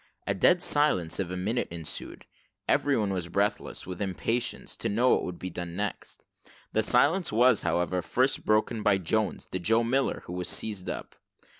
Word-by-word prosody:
A - - 0
dead 180 0 +3
silence 120 - +2
of 95 -3 -2
a 90 - -4
minute 110 +7 -1
ensued. 85 -2 -6 0.4
Everyone 110 -9 +2
was 90 -3 -3
breathless, 100 +4 -1
with 90 0 -7
impatience, 100 +6 -2
to - - -2
know 120 +5 +2
what - - +4
would 90 -1 -5
be 95 - -6
done 85 0 -6
next. 100 +1 -5 0.5
The 110 - +3
silence 145 - +3
was, 120 +1 +4
however, 90 +1 0
first 130 +9 0
broken 110 +1 +1
by 105 -2 +3
Jones, 105 +4 -1
the 95 - -2
Joe 115 +6 +2
Miller, 130 +4 0
who 90 - -7
was 90 0 -3
seized 105 -4 -2
up. - - -6
105 Hz, 175 wpm, -28 LUFS, 90-120 Hz, 0.5 s, what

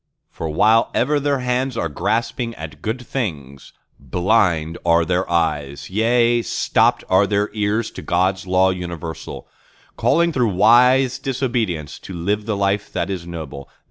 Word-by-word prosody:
—for 80 - -5
while 110 +8 +3
ever 145 +4 +2
their 140 -2 0
hands 125 0 -1
are 85 - 0
grasping 115 - -2
at - - -9
good 120 +3 -4
things, 75 - -5 0.3
Blind 85 - +1
are 85 -1 +3
their 90 +2 -1
eyes, 75 -3 -1
yea, 120 +3 +2
stopped - - +1
are 95 +2 +3
their 105 0 0
ears 105 +1 -1
to - - -9
God's 95 +1 0
Law 95 +1 +3
universal, 85 -3 -7 0.5
Calling 170 0 +2
through 120 -8 +1
wise 125 +5 +4
disobedience 120 - -2
to 95 - -9
live 100 +5 -2
the 105 -2 -1
life 100 +1 0
that 90 +3 -2
is 90 -3 -5
noble. 75 -5 -8
100 Hz, 145 wpm, -20 LUFS, 85-120 Hz, 0.5 s, wise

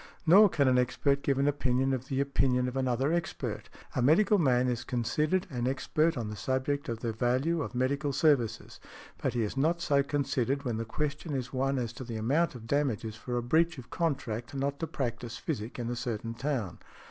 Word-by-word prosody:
Nor 195 +6 +8
can 140 -5 +2
an 125 -1 +4
expert 140 +3 +1
give 140 -1 +1
an 140 +1 +2
opinion 135 -2 +1
of 130 0 -3
the 135 -1 -1
opinion 130 -2 +1
of 125 - -4
another 130 +3 +1
expert. 170 -1 -3 0.3
A - - +1
medical 195 - +4
man 130 -5 +3
is 120 -1 -1
considered 150 +9 0
an 125 -2 -1
expert 155 +4 +1
on 115 -3 -3
the - - -5
subject 130 +4 -1
of 115 -1 -4
the 115 -1 -2
|120| - - -17
value 135 +7 +1
of 135 - -5
medical 140 +3 0
services. 135 -6 +1 0.4
But 125 - -1
he 120 - +1
is 105 - -3
not 160 +5 +1
so 140 -5 +2
considered 140 -1 -1
when 120 -3 -1
the 115 - -3
question 150 +4 -3
is 130 0 -4
one 135 +1 0
as 120 -2 -2
to 130 - -7
the 115 -2 -5
amount 140 +9 +1
of 115 -2 -9
damages 120 -5 -1
for 120 +2 -4
a 120 - -1
breach 160 +6 +2
of 125 - -11
contract 125 -9 -2
not 140 +1 -2
to 165 - -2
practise 120 -6 -4
physic 110 +3 -4
in 120 -2 -3
a - - -2
certain 115 -2 -3
town. 120 -8 -3
130 Hz, 210 wpm, -30 LUFS, 120-145 Hz, 0.4 s, Nor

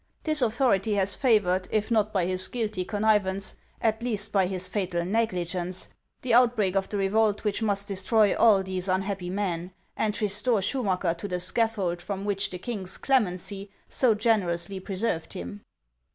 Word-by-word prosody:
This 310 -2 +1
authority 225 -4 +2
has 200 0 +1
favored, 195 -8 +2
if 215 +2 -1
not 215 -2 +2
by 190 -4 +1
his 185 +1 -2
guilty 215 -6 -2
connivance, 205 -1 +1 0.3
at 220 0 0
least 215 -3 -1
by 195 -3 +3
his 185 -1 -2
fatal 180 -4 -2
negligence, 185 -3 -1 0.3
the 245 -2 0
outbreak 230 -6 +4
of 195 0 0
the 205 - -2
revolt 210 +2 +1
which 210 0 0
must 200 -2 0
destroy 205 +2 +2
all 205 -4 +5
these 185 0 -3
unhappy 190 -1 -1
men, 180 -2 -3 0.2
and 210 -1 -1
restore 210 +1 +1
Schumacker 190 -7 0
to 205 - -4
the 180 -2 -2
scaffold 190 -2 0
from 195 +2 -5
which 200 -1 0
the 180 - -6
king's 190 -2 -3
clemency 200 -5 0 0.2
so 240 -5 +3
generously 195 -5 0
preserved 190 -3 -2
him." 90 +4 -7
200 Hz, 160 wpm, -27 LUFS, 185-220 Hz, 0.3 s, all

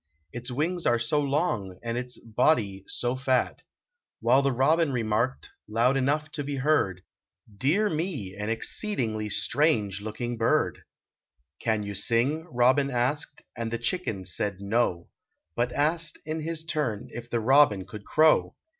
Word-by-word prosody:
Its 120 +1 -5
wings 165 +7 -1
are 120 - +4
so 145 +6 +1
long 135 - -1
and 115 0 -2
its 125 0 -3
body 110 -4 +1
so 120 +1 -1
fat! 130 -1 0 0.3
" 480 -1 -61
While 125 +4 +4
the 140 0 +1
robin 150 +5 +3
remarked, 115 +1 -1 0.2
loud 115 +5 +2
enough 145 +3 0
to 145 - -3
be 140 0 -3
heard, 135 - +1 0.5
Dear 160 - +2
me! 155 - -3
an 105 +1 -4
exceedingly 115 - 0
strange 105 - +1
looking 120 +3 -4
bird! 115 - +1 0.4
" 65 +4 -50
Can 110 -2 +1
you 100 0 -5
sing?" 120 - +1
robin 130 +3 +3
asked, 130 +3 -1
and 115 -2 -3
the 115 - -2
chicken 115 - -2
said, 95 +2 -2
"No," 100 -4 0 0.5
But 120 +1 0
asked 155 +4 +1
in 155 +1 -3
his 160 0 -3
turn 125 -9 -2
if 120 0 -8
the 120 - 0
robin 115 -5 +4
could 105 -2 -9
crow. 155 +6 +3
125 Hz, 155 wpm, -27 LUFS, 110-150 Hz, 0.5 s, are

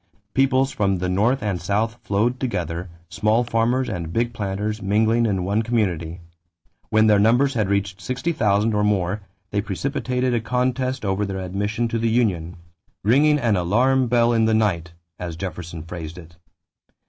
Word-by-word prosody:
Peoples 135 0 +2
from 100 -5 0
the 90 +1 -2
North 105 +7 +1
and 100 -4 -2
South 110 +3 -1
flowed 115 +5 0
together, 90 - -3 0.2
small 105 +8 +1
farmers 120 +2 +1
and 85 -7 -4
big 120 +5 0
planters 105 0 -3
mingling 110 +4 +2
in 95 -4 0
one 100 +4 +1
community. 90 -8 -1 0.7
When 110 0 +4
their 105 -2 +5
numbers 120 +6 +3
had 110 -5 0
reached 100 -1 -1
sixty 130 - -2
thousand 105 -5 +1
or 105 0 +1
more, 100 -1 0 0.3
they 100 - 0
precipitated 125 +4 -2
a 120 - +1
contest 125 +2 -1
over 95 +1 0
their 95 -1 -3
admission 100 +5 -2
to 115 - -1
the 115 0 +1
union, 95 -7 0 0.5
"ringing 145 +7 +4
an 115 -7 +1
alarm 125 +9 +2
bell 120 0 +3
in 115 -1 +3
the 110 0 +3
night," 85 -6 0 0.3
as 85 -2 -5
Jefferson 85 -2 -6
phrased 85 0 -7
it. 85 -1 -12
105 Hz, 165 wpm, -22 LUFS, 95-120 Hz, 0.7 s, their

